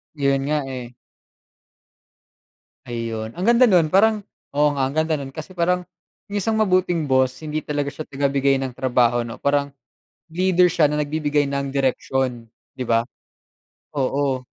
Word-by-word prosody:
Yun 140 -2 +1
nga, 150 0 +1
eh. 125 -2 -6 2.0
Ayun, 115 -2 -4
ang 180 - -4
ganda 240 +2 +6
no'n 175 -7 +4
parang 210 +3 +4 0.3
oo, 150 +1 +4
nga 135 - -1
ang 135 - -5
ganda 160 0 +1
no'n 135 -1 -8
kasi 155 +3 -7
parang, 180 +1 +1 0.5
yung 205 0 -2
isang 220 +3 0
mabuting 180 -6 +1
boss 130 -1 +2
hindi 155 -1 -3
talaga 145 -1 -2
siya 155 - -7
tagabigay 140 -1 +1
ng 130 -2 -5
trabaho 120 -2 +2
'no. 115 - -8
Parang 140 0 +1 0.6
leader 180 +1 +3
siya 155 - +3
na 150 +1 0
nagbibigay 150 0 0
ng 140 0 -3
direksyon, 130 -2 -1 0.3
di 130 -2 -5
ba. 115 0 +3 0.9
Oo. 135 -1 0
140 Hz, 150 wpm, -22 LUFS, 130-160 Hz, 2.0 s, ganda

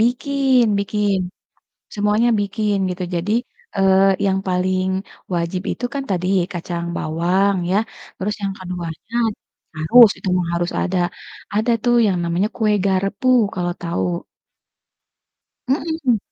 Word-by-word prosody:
Bikin 260 +2 +2 0.2
bikin, 205 0 0 0.8
semuanya 210 +3 +2
bikin, 205 +1 0
gitu. 180 0 -4
Jadi, 175 +5 -1 0.4
eee, 190 -1 +4 0.3
yang 190 -1 +2
paling 185 0 +1 0.5
wajib 170 +1 -1
itu 245 - -3
kan 280 -1 -2
tadi 180 -2 -1 0.3
kacang 170 0 -4
bawang 180 +5 +1 0.2
ya, 195 - +3 0.4
terus 210 +3 -2
yang 195 -1 -1
keduanya 180 +3 -7 0.6
harus, 220 +10 +7
itu - - -7
mah 175 -2 -1
harus 175 0 -1
ada. 185 0 -1 0.6
Ada 220 +3 +2
tuh 240 -1 +3
yang 190 -3 +1
namanya 170 +4 +1
kue 215 -2 +1
garpu 195 +5 0 0.3
kalau 175 -1 -1
tahu. 170 0 -2 1.7
Mhm. 280 -3 +1
195 Hz, 120 wpm, -20 LUFS, 180-220 Hz, 1.7 s, harus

